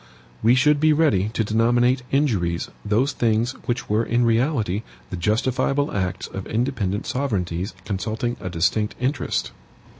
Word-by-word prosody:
WE 115 +3 +5
SHOULD 145 +2 +4
BE 155 +1 +4
READY 110 - +2
TO 110 0 0
DENOMINATE 120 +4 +2
INJURIES 100 - 0
THOSE 115 +7 +1
THINGS 115 0 +1 0.2
WHICH 125 +2 -2
WERE 105 +2 +2
IN 120 +1 +2
REALITY 115 - +1 0.3
THE - - -3
JUSTIFIABLE 130 +9 0
ACTS 95 -3 -2
OF 95 - -7
INDEPENDENT 110 -4 -1
SOVEREIGNTIES 100 -8 -2
CONSULTING 110 +4 -2
A 90 - -5
DISTINCT 95 +5 0
INTEREST. 130 +2 -1
115 Hz, 140 wpm, -23 LUFS, 100-130 Hz, 0.3 s, WE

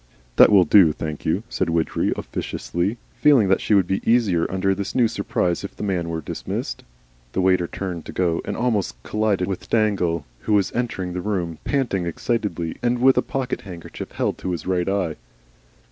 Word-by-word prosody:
"That - - +8
will 100 -3 +7
do, 85 -1 +6
thank 75 -1 -5
you," 90 +7 +1
said 95 -6 -1
Widgery, 80 -1 0
officiously, 95 +7 -3 0.2
feeling 135 -10 +4
that 95 - +3
she 105 - +2
would 95 -3 +4
be 95 +2 -1
easier 105 -8 +2
under 95 +1 +1
this 100 0 -4
new 120 -3 +4
surprise 100 -5 -1
if 100 - -7
the - - -6
man 90 -4 -1
were 80 -1 -3
dismissed. - - -5 0.5
The 95 - +1
waiter 90 -2 +3
turned 90 -4 -5
to - - -5
go, 85 -3 0
and - - -4
almost 105 - 0
collided 105 -4 0
with 95 -2 -5
Dangle, 95 -8 +1
who 110 - -1
was 100 -2 +3
entering 95 -7 -2
the 90 - -3
room, 90 -5 -2
panting 115 -11 0
excitedly 85 -3 -2
and 120 0 +1
with 130 +2 +5
a - - +3
pocket 130 -2 -3
handkerchief 90 -4 -9
held - - -1
to 90 - -3
his 85 - -5
right 90 -1 0
eye. 95 -5 -1
95 Hz, 190 wpm, -22 LUFS, 85-105 Hz, 0.5 s, That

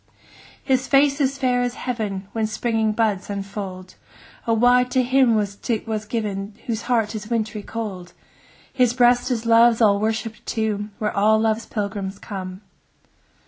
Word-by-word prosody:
His 260 -1 +1
face 280 +1 +3
is 275 0 +1
fair 250 -2 +1
as 245 0 -1
heaven 210 -6 -4
When 220 -1 -1
springing 220 0 0
buds 210 -4 0
unfold: 195 -2 -6 0.5
O 230 - +3
why 245 +2 +5
to 255 +1 +1
him 255 -2 +3
was 205 -2 -1
't 220 +1 -3 0.2
given, 205 -3 -3
Whose 225 -2 -2
heart 225 -3 +1
is 215 0 -6
wintry 220 -2 -2
cold? 200 -5 -6
10 175 - -22 0.6
His 250 -3 +3
breast 245 0 +4
is 235 -2 -2
Love's 230 0 +5
all 205 -3 +4
worshipp'd 220 +1 -2
tomb, 215 -2 -1
Where 210 -1 -2
all 215 +2 +4
Love's 220 +1 0
pilgrims 200 -2 -4
come. 185 -2 -7
220 Hz, 155 wpm, -22 LUFS, 205-245 Hz, 0.6 s, why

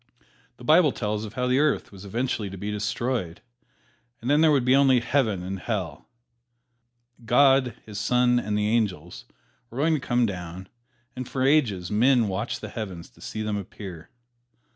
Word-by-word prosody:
The - - -14
Bible 155 +3 +5
tells 105 -2 -3
of 105 - -9
how 125 - -1
the 125 +2 +2
Earth 150 -1 +1
was 100 0 -12
eventually 110 0 -2
to 95 - -8
be 105 +3 -4
destroyed, 105 -3 -2 0.8
and 120 +4 -2
then 150 +2 +4
there 160 -1 +5
would 135 -4 +2
be 130 +1 +5
only 135 -2 +5
Heaven 115 -7 0
and 95 +1 -5
Hell. 90 -9 -4 1.1
God, 130 0 +4
His 105 -2 -7
Son 125 +2 +3
and 105 -2 -2
the 105 0 +1
angels 100 -7 -1 0.4
were 120 - -11
going 160 +4 +2
to 155 - +1
come 120 -2 +1
down, 90 -2 -6 0.5
and 130 -1 -6
for 130 - -2
ages 120 - +2
men 120 +2 +3
watched 100 +4 -3
the - - -6
heavens 95 - -7
to - - -22
see 110 - -5
them 105 -1 -2
appear. 95 -4 -9
110 Hz, 175 wpm, -25 LUFS, 100-130 Hz, 1.1 s, Bible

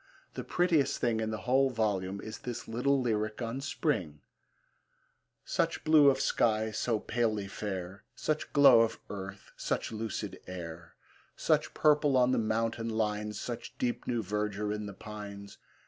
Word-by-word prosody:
The - - -5
prettiest 175 -5 +2
thing 115 -2 +1
in 110 0 -1
the 110 -2 -4
whole 135 +2 +4
volume 100 -5 -1
is 110 0 -7
this 120 -2 -6
little 135 +5 +1
lyric 110 -3 -1
on 120 +2 -3
Spring: 115 - -2 1.2
Such - - 0
blue 155 -2 +7
of 135 -1 +2
sky, 110 -4 +2
so 110 +1 0
palely 110 -3 -1
fair, 95 -1 -5
Such 155 0 -2
glow 135 -5 +8
of 115 - 0
earth, 95 0 -7
such - - -2
lucid 110 -3 -4
air! 85 -2 -8 0.4
Such - - +1
purple 150 -3 +4
on 125 0 +4
the - - +2
mountain 115 +1 -1
lines, 105 -1 -1
Such 120 -2 -6
deep 120 -1 -2
new 120 -2 0
verdure 105 +1 -2
in 105 0 -4
the 100 - -8
pines! 100 -1 -9
110 Hz, 150 wpm, -31 LUFS, 105-125 Hz, 1.2 s, glow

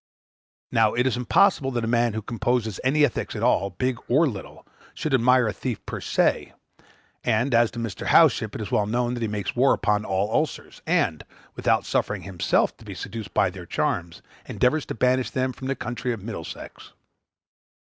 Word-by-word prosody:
Now, 110 -2 +3
it 120 +1 +2
is 130 - +1
impossible 135 - +3
that 120 -3 -2
a - - -1
man 120 -1 +2
who 110 0 -4
composes 115 -2 -1
any 145 +3 +4
ethics 120 - -3
at - - -4
all, 100 +2 +2
big 125 +6 -2
or 145 +7 +4
little, 105 -8 -8 0.3
should 155 -3 -3
admire 125 -1 +4
a 105 - -1
thief 125 -5 -5
per - - -5
se, - - +1 0.7
and, 120 +3 +1
as 120 -1 +4
to - - -12
Mr. 115 -6 -4
Howship, - - +4
it - - -4
is - - -6
well 105 - +2
known 120 +2 0
that 120 - -4
he 115 - 0
makes 105 -2 -3
war 130 +3 +4
upon 105 -1 0
all 100 +2 -1
ulcers; 155 +4 -2
and, - - +1 0.3
without - - +1
suffering - - -1
himself 90 -4 0
to - - -16
be - - -8
seduced 110 -6 -7
by 95 - +3
their 90 -2 -10
charms, 85 0 -2 0.2
endeavors 135 +4 +1
to - - -4
banish 125 +2 +2
them 130 -2 -1
from 130 +2 -7
the 135 - -1
county 120 +1 -3
of 110 -5 -5
Middlesex. 85 -7 -8
120 Hz, 190 wpm, -24 LUFS, 105-130 Hz, 0.7 s, any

